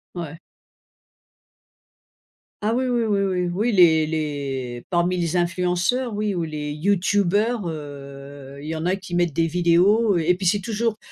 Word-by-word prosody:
Ouais. 165 -2 -6 2.2
Ah 215 +2 0
oui, 255 +1 0
oui, 240 -2 +1
oui, 210 -3 +1
oui. 185 -2 0
Oui 215 +6 0
les 165 -6 +5
les 140 -6 -4
parmi 175 0 +1
les 175 0 -1
influenceurs 180 +8 0
oui, 210 -1 -1
ou 170 - -1
les 150 -2 -4
youtubeurs, 200 +6 +1
heu, 140 -2 -9
il 150 - -8
y 160 - -3
en 160 +1 -4
a 185 +2 +1
qui 185 -2 -7
mettent 175 -1 +2
des 165 +3 +1
vidéos 180 +5 +3
et 170 +2 +2
puis 185 +1 -5
c'est 205 +4 +3
toujours 225 +1 -2
175 Hz, 155 wpm, -23 LUFS, 155-205 Hz, 2.2 s, les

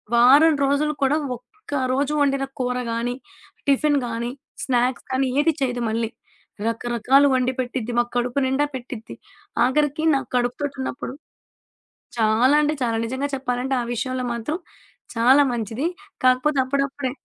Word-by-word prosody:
వారం 285 +7 +7
రోజులు 290 +2 +1
కూడా 270 +2 +3 0.2
ఒక్క 355 - -19 0.2
రోజు 280 +2 0
వండిన 275 -1 +2
కూర 250 0 -1
గాని, 235 +2 -2 0.5
టిఫిను 285 +1 +3
గానీ, 235 +1 -3 0.3
స్నాక్స్ 250 -1 0
గాని 260 +1 +1
ఏది 325 +2 +2
చేయదు 245 -2 0
మళ్ళీ. 225 0 -1 0.6
రకరకాలు 240 +4 +3
వండి 255 0 +1
పెట్టిద్ది. 245 -2 -3
మాకు 240 0 0
కడుపు 245 +3 0
నిండా 280 +3 +1
పెట్టిద్ది. 245 -3 -8 0.5
ఆగరికి 295 +4 +1
నాకు 270 - -3
కడుపుతోటి 250 +4 -2
ఉన్నప్పుడు 260 0 -5 1.0
చాలా 225 +5 +4
అంటే 300 +1 +1
చాలా 230 -2 0
నిజంగా 260 +4 -2
చెప్పాలంటే 260 0 -2
ఆ - - -4
విషయంలో 255 +1 -2
మాత్రం 265 +8 -3 0.6
చాలా 260 +5 +6
మంచిది. 230 +6 -2 0.4
కాకపోతే 255 +3 +3
అప్పుడప్పుడే 275 0 -1
260 Hz, 130 wpm, -23 LUFS, 240-280 Hz, 1.0 s, వారం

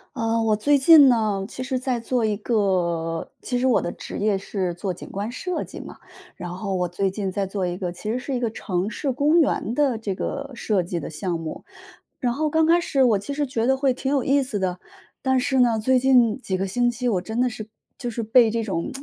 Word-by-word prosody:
呃， 225 0 0
我 220 -1 +3
最 285 +7 +3
近 285 0 +8
呢， 215 -5 +1
其 255 - -6
实 260 0 -2
在 250 -1 -1
做 235 +1 -1
一 215 -2 0
个 175 -7 -1
其 245 - -2
实 250 - 0
我 255 -3 +3
的 175 - -3
职 - - -7
业 205 -1 +1
是 190 -2 -3
做 185 +1 -3
景 175 - -11
观 205 +4 -4
设 360 +8 -3
计 - - -10
嘛， - - -10 0.4
然 175 - -7
后 195 +1 -3
我 180 -1 0
最 190 +3 -1
近 195 0 -3
在 195 0 -2
做 190 -1 -2
一 175 0 -3
个， 180 -2 -3
其 210 +5 -5
实 250 - -1
是 265 0 -4
一 - - -1
个 235 -2 -1
城 185 -4 -2
市 270 +5 -2
公 295 +6 +3
园 235 -6 0
的 270 -3 +1
这 220 -3 -3
个 280 +8 -4
设 210 -5 0
计 175 0 -3
的 145 - -6
项 165 +2 -3
目。 160 -1 -7 0.5
然 245 -3 0
后 305 +4 0
刚 320 +1 +3
开 340 +1 +4
始 275 -5 0
我 225 -4 +4
其 205 +9 -5
实 290 +1 -1
觉 230 -3 -1
得 265 +1 +3
会 265 -2 +2
挺 265 +2 -3
有 280 - +2
意 275 +2 +2
思 230 -6 -3
的， 185 -1 -1 0.4
但 265 -1 +2
是 265 0 +1
呢， 235 -3 +3
最 260 +4 +3
近 250 -4 +4
几 190 -6 -2
个 195 +1 -2
星 240 +5 +1
期， 245 +1 -3
我 195 -7 +1
真 220 +5 -4
的 250 0 +3
是 215 -2 -8 0.3
就 245 - -4
是 235 0 -4
被 225 +1 +4
这 230 +1 -1
种 185 -6 -3
225 Hz, 265 characters per minute, -23 LUFS, 195-260 Hz, 0.5 s, 近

